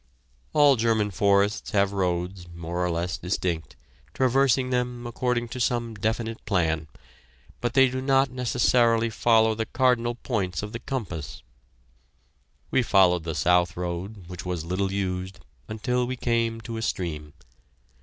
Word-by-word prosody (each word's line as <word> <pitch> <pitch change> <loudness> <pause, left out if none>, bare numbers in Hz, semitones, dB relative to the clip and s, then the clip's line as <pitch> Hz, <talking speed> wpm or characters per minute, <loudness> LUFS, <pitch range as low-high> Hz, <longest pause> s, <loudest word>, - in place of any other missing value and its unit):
All 145 -3 +5
German 110 -2 +1
forests 100 +2 +2
have 100 -1 +3
roads, 90 -1 -2
more 85 +1 -3
or 90 - 0
less 85 +1 -2
distinct, 85 -5 -2 0.4
traversing 130 0 +2
them 125 -1 -1
according 120 0 -1
to 125 - -6
some 120 -1 0
definite 110 +2 -2
plan, 80 -6 0 0.7
but 120 +1 -2
they 135 -1 +7
do 130 +1 -3
not 135 0 +2
necessarily 120 -2 +2
follow 110 0 +3
the 110 0 -3
cardinal 120 -2 +1
points 100 -8 -2
of 105 - -5
the 115 - -5
compass. 105 - -5 1.3
We 130 - +3
followed 90 -7 +3
the 80 -2 -3
south 90 -1 +2
road, 90 +3 -5
which 90 -1 -7
was 90 -3 -3
little 95 +2 -1
used, 95 -1 -3 0.3
until 125 +3 -1
we 130 - -3
came 115 -2 0
to 115 -1 -6
a - - -4
stream. 75 -8 -3
110 Hz, 145 wpm, -25 LUFS, 90-120 Hz, 1.3 s, they